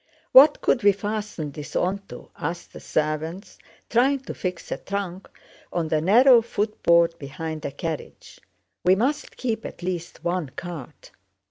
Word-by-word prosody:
"What 285 +3 +8
could 245 - +2
we 205 -1 +5
fasten 205 -6 -4
this 150 +1 -9
onto?" 195 +2 -3
asked 170 +4 -5
the - - -9
servants, 155 +5 -3 0.3
trying 265 +3 +2
to - - -7
fix 180 -2 -5
a - - -1
trunk 195 -2 -5 0.4
on 165 -2 -1
the 155 -1 +1
narrow 235 - +7
footboard 170 -7 +2
behind 155 +2 -6
a - - -2
carriage. 155 +2 -6 0.4
"We 185 +1 +5
must 275 +9 -1
keep 225 -3 -2
at - - -8
least 175 -2 -4
one 175 -4 -1
cart." 165 -4 -8
180 Hz, 145 wpm, -24 LUFS, 160-215 Hz, 0.4 s, What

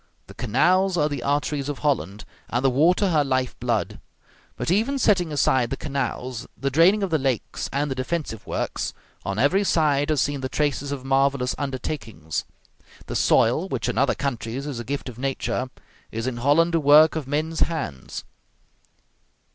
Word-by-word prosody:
The - - -13
canals 185 - +2
are 150 - +3
the 145 -4 -4
arteries 145 +1 -1
of 145 - -3
Holland, 105 - -1 0.2
and 120 +3 -1
the 135 - +4
water 175 +8 +3
her 155 -3 +3
life 130 -2 -1
blood. 120 -3 -1 0.6
But - - -2
even 225 +9 +2
setting 185 -9 +2
aside 130 -4 +2
the - - -3
canals, 130 -3 -3
the 140 0 -2
draining 180 +8 +5
of 190 - -2
the 160 - +2
lakes, 130 -4 -2
and 145 +1 -1
the - - +2
defensive 130 - -4
works, - - -3 0.3
on 100 +1 -3
every 160 - +3
side 150 -5 +2
are 155 - +3
seen 140 0 0
the 130 - -3
traces 145 -1 -1
of 135 -2 -5
marvelous 135 -1 +2
undertakings. 130 - -4 0.6
The - - -6
soil, 130 +11 +3
which 130 -7 -2
in - - -1
other 135 0 +3
countries 130 -1 -3
is 140 -5 -4
a - - -4
gift 140 +4 -4
of 125 -2 -8
nature, 130 -1 -2 0.4
is 115 +1 -3
in 130 -2 -2
Holland 150 +7 +3
a 165 - +3
work 150 +2 +6
of 155 -4 -3
men's 155 +3 -1
hands. 95 - -2
140 Hz, 175 wpm, -24 LUFS, 125-155 Hz, 0.6 s, work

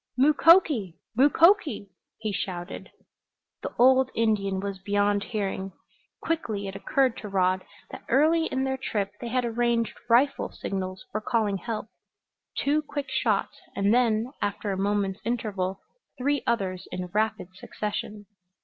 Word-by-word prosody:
"Mukoki! 285 - +5 0.2
Mukoki!" 290 - +4 0.3
he 215 -1 -3
shouted. 180 -1 -5 0.7
The - - -4
old 260 +1 +5
Indian 205 -4 +1
was 200 -1 -4
beyond 205 +1 +1
hearing. 195 -3 -3 0.5
Quickly 220 -12 -2
it 195 - -6
occurred 255 +5 +1
to 210 - -7
Rod 185 -1 +1 0.3
that - - -9
early 320 +5 +4
in 265 - -1
their 265 0 -1
trip 200 -5 -1
they 240 - -4
had 250 +1 0
arranged 235 0 0 0.2
rifle 265 +5 +3
signals 185 -1 -5
for 215 - -2
calling 215 -3 0
help 215 +3 -4 0.7
two 295 +2 +2
quick 290 -2 -5
shots, 235 -6 0 0.2
and 200 +2 +2
then, 235 -1 +2
after 205 0 -2
a - - -1
moment's 195 0 0
interval, 205 -6 -2 0.4
three 285 +2 0
others 190 -5 -1
in 180 - -3
rapid 215 -3 0
succession. 210 +1 -5
215 Hz, 135 wpm, -26 LUFS, 195-260 Hz, 0.7 s, Mukoki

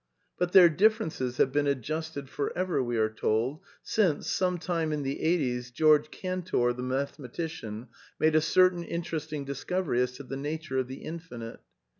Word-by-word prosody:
But 180 0 +1
their 185 -3 +10
differences 165 - +1
have 130 - +3
been 145 +1 +1
adjusted 140 +2 -2
for 140 +1 -3
ever, 180 -6 +1
we 120 -2 -1
are 110 -1 +3
told, 110 +6 -1 0.2
since, 185 -9 +1
some 180 -1 +1
time 165 -2 -1
in 150 -1 -1
the 135 +1 -3
'eighties, 125 -7 0
George 150 +3 +4
Cantor, 185 -11 -1
the 125 - -6
mathematician, 130 -2 -4 0.3
made 155 0 +3
a 155 - +6
cer 185 +3 +5
tain 175 -1 -6
interesting 160 -4 -4
discovery 140 0 -1
as 125 0 0
to 135 +2 -9
the 135 +1 -6
nature 150 -1 -3
of 130 - -1
the 130 +1 -8
Infinite. 140 -9 -7
150 Hz, 170 wpm, -29 LUFS, 125-170 Hz, 0.3 s, their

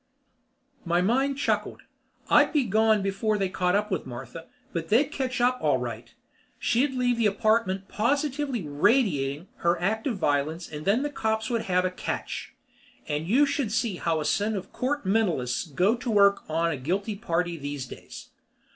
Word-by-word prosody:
My 170 0 +1
mind 265 +7 +1
chuckled. 280 - -1 0.4
I'd - - +5
be 295 -4 +2
gone 220 -1 +3
before 200 +2 0
they 195 -2 0
caught 180 0 +1
up 210 +1 0
with 185 -7 -2
Martha, 130 +6 -8 0.3
but 165 -1 -3
they'd 265 +8 +3
catch 260 -4 -2
up 250 +1 +2
all - - +3
right. - - -6 0.5
She'd 260 +3 +1
leave 245 -1 +1
the 225 - +4
apartment 205 -2 +1
positively 275 +1 -1
radiating 150 - +1
her 170 0 +1
act 220 +7 -1
of 235 -6 -1
violence 155 +1 0
and 150 0 -8
then 220 +7 +2
the 290 - -2
cops 220 -2 -1
would 230 -2 -1
have 180 0 +2
a 185 - 0
catch. 185 - -5 0.5
And 150 +2 -2
you 260 +9 +4
should 280 -6 -1
see 225 -4 0
how 165 -2 0
a 150 - -3
set 205 +8 +1
of 190 -1 -6
Court 285 -1 -2
Mentalists 180 - +1
go 180 +8 +2
to 245 0 -4
work 200 -4 +3
on 165 +1 +1
a 145 - -3
guilty 195 - -2
party 175 -4 -1
these 145 -3 -5
days. - - -11
200 Hz, 175 wpm, -26 LUFS, 170-235 Hz, 0.5 s, I'd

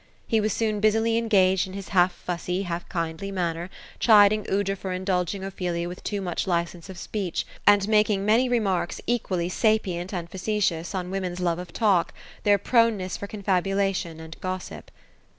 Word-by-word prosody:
He 220 -1 +2
was 215 +1 0
soon 215 0 0
busily 220 +2 +2
engaged, 190 -5 +3
in 190 - -9
his 195 -1 -7
half 180 -2 +4
fussy, 180 +1 -3
half 175 -1 -5
kindly 165 +2 -3
manner, 175 -2 -2 0.3
chiding 210 -2 +5
Aoudra 195 0 0
for 190 -1 -5
indulging 185 0 -1
Ophelia 180 -3 -3
with 180 +1 -8
too 205 -2 -2
much 180 -1 -2
li 170 -2 +2
cence 170 +1 -13
of 190 - -8
speech; 190 -1 -3 0.2
and 205 -1 +6
making 210 -2 +2
many 230 +4 +3
remarks 195 -8 0
equally 190 -7 -1
sapient 185 -3 0
and 175 -4 -4
face 195 +3 0
tious, 165 +3 -6
on 180 -1 -3
women's 185 -2 -3
love 175 -1 0
of 180 -1 -8
talk, 195 -6 +2 0.3
their 205 -1 +4
proneness 215 -3 +2
for 200 - -6
confabulation 195 -4 -1
and 160 0 -10
gossip. 185 0 -5
190 Hz, 170 wpm, -25 LUFS, 175-210 Hz, 0.3 s, and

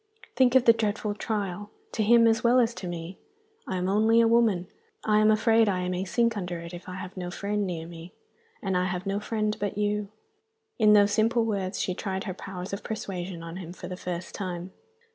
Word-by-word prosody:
Think 250 0 +4
of 260 - +6
the 230 - +8
dreadful 215 -1 -1
trial 205 -2 -3 0.2
to 225 - -2
him 230 +2 +6
as 225 +2 +3
well 245 +2 +5
as 235 -1 +2
to 180 -2 -7
me! 175 +1 -6 0.5
I 190 - -2
am 180 0 -1
only 220 +4 +4
a 230 - +5
woman; 225 -6 +3 0.4
I 210 -1 +4
am 215 0 +5
afraid 225 0 +4
I 180 -2 -1
may 185 +1 -2
sink 230 +4 +1
under 180 -4 -4
it, 170 +1 -9
if 175 +1 -9
I 180 - -6
have 185 0 -7
no 180 -2 -4
friend 200 +2 -2
near 165 -3 -4
me. 170 +1 -10 0.5
And 190 -2 -1
I 180 0 +2
have 180 0 -3
no 195 +1 -1
friend 215 0 -1
but 205 -1 -3
you." 210 0 0 0.7
In 215 -1 +6
those 205 -1 +5
simple 225 +2 +2
words 200 -3 -2
she 185 - 0
tried 190 0 -3
her 190 - -4
powers 185 0 -7
of 200 - -4
persuasion 185 -5 -5
on 165 +1 -7
him 175 -2 -7
for 180 - -9
the 180 - -5
first 180 -1 -5
time. 180 -2 -5
200 Hz, 220 wpm, -27 LUFS, 180-220 Hz, 0.7 s, the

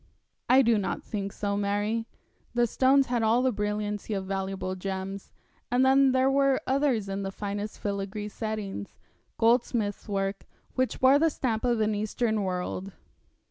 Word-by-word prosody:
'I 260 +2 +7
do 230 -2 +4
not 195 - -3
think 200 -2 -4
so, 200 0 -2
Mary. 205 +3 -1 0.5
The 240 0 +4
stones 265 +4 +4
had 245 -2 0
all 225 +3 +3
the 260 - +3
brilliancy 210 0 -2
of 190 -1 -3
valuable 190 -1 -3
gems, 190 +1 -5 0.4
and 250 +2 +3
then 270 0 +5
there 260 0 +3
were 275 0 +3
others 265 -6 +1
in 195 0 -3
the 195 - -3
finest 205 +1 -5
filagree 200 +1 -3
settings 210 - -5 0.4
goldsmith's 225 -3 +1
work 195 0 -2 0.3
which 255 -1 -1
bore 265 +2 +6
the 325 +1 +4
stamp 235 -6 -2
of 240 -3 +1
an 215 0 +2
Eastern 215 +1 -1
world. 185 0 -3
215 Hz, 155 wpm, -28 LUFS, 200-245 Hz, 0.5 s, I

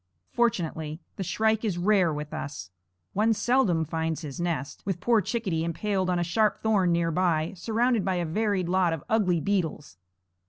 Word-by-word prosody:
Fortunately 160 -9 -1 0.2
the 195 - -2
shrike 220 +4 +1
is 200 -6 -1
rare 185 -2 +3
with 150 0 -5
us; 140 - -6 0.4
one 220 +2 +2
seldom 205 -7 +2
finds 160 0 -2
his 145 -1 -7
nest, 160 -5 -3
with 190 -3 -2
poor 230 +3 +3
Chickadee 190 -6 -1
impaled 185 +3 -1
on 180 - +1
a 175 - +1
sharp 210 +5 +1
thorn 200 -5 +3
near 170 -1 +1
by, 165 -2 +1
surrounded 230 +3 +1
by 190 0 0
a 175 -1 -1
varied 195 +1 0
lot 180 -2 +2
of 160 - -5
ugly 195 -6 +2
beetles. 160 - -2
180 Hz, 170 wpm, -27 LUFS, 160-210 Hz, 0.4 s, rare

